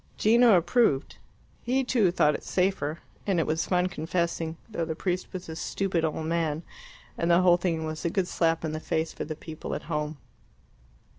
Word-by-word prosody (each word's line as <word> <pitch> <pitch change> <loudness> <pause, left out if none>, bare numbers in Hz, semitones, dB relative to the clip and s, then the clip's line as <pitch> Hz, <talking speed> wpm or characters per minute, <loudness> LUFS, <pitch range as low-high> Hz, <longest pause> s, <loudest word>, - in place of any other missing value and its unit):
Gino 230 -1 +6
approved; 175 - +2 0.4
he, 260 +3 +1
too, 235 -7 +3
thought 150 -4 +3
it - - -5
safer, 180 -5 0 0.3
and 190 -4 +2
it 165 - +2
was 160 +1 -1
fun 180 -1 +2
confessing, 170 -2 -2
though 215 -7 -3
the 160 -1 -3
priest 180 +2 -2
was 185 -1 -6
a 160 - -6
stupid 180 0 -1
old 160 0 -1
man, 160 -1 -1 0.6
and 170 - +1
the 170 +1 +5
whole 175 -1 +6
thing 165 -3 -1
was 155 0 -5
a 170 - +1
good 185 +1 0
slap 165 -2 +1
in 155 - -2
the 155 - -3
face 160 +1 -2
for - - -5
the 155 +1 -5
people 155 0 -6
at - - -5
home. 150 -1 -3
170 Hz, 195 wpm, -27 LUFS, 160-185 Hz, 0.6 s, Gino